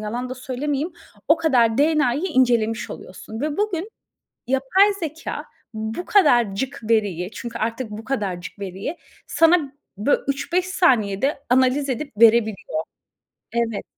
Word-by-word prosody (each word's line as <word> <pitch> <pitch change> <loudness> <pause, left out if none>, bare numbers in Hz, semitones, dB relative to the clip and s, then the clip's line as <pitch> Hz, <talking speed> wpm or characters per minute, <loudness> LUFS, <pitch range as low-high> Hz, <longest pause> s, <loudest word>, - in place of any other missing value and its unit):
yalan 240 +4 -4
da 255 - -3
söylemeyeyim 275 +5 -3 0.4
o 315 - +6
kadar 245 -8 +2
DNA'yı 300 -1 +2
incelemiş 240 -9 +1
oluyorsun. 220 +4 -9
Ve 300 +1 -2
bugün 410 -3 -1 0.6
yapay 320 +11 +3
zekâ 320 -1 -5 0.3
bu 220 +10 -4
kadarcık 260 - +2
veriyi, 200 -4 +1
çünkü 235 +3 -6
artık 230 +2 -2
bu 210 +1 -7
kadarcık 200 -7 -4
veriyi 195 - -5 0.3
sana 330 -4 +3 0.3
bö 225 +8 +3
3-5 345 +6 0
saniyede 270 - +2
analiz 260 +3 +3
edip 275 +3 -3
verebiliyor. 220 -5 +4 0.8
Evet. 230 -3 -1
255 Hz, 120 wpm, -22 LUFS, 220-305 Hz, 0.8 s, o